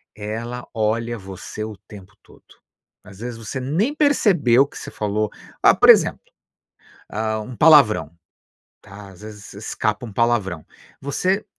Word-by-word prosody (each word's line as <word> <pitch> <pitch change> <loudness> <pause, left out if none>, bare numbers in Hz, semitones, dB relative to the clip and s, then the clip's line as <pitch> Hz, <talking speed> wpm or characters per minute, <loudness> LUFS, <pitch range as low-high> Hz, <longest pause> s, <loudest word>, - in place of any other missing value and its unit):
ela 115 +4 -6
olha 115 +2 -1
você 95 +2 -8
o 110 -2 -7
tempo 95 -3 -13
todo. - - -21 0.6
Às 100 -1 -15
vezes, 120 0 -6
você 115 +4 -6
nem 170 - -1
percebeu 180 - +3
o 140 - -6
que - - -13
você - - -8
falou, 105 0 -2 0.3
ah, - - +7
por - - +4
exemplo, - - +6 0.9
hã, 110 +1 -2
um 125 +4 -8
palavrão, 135 - +5 0.7
tá, 100 0 -12
às 95 +1 -16
vezes 105 -2 -11
escapa 105 +2 -3
um 110 - -10
palavrão, 105 -7 0 0.4
você 185 +9 -1
110 Hz, 145 wpm, -21 LUFS, 105-130 Hz, 0.9 s, ah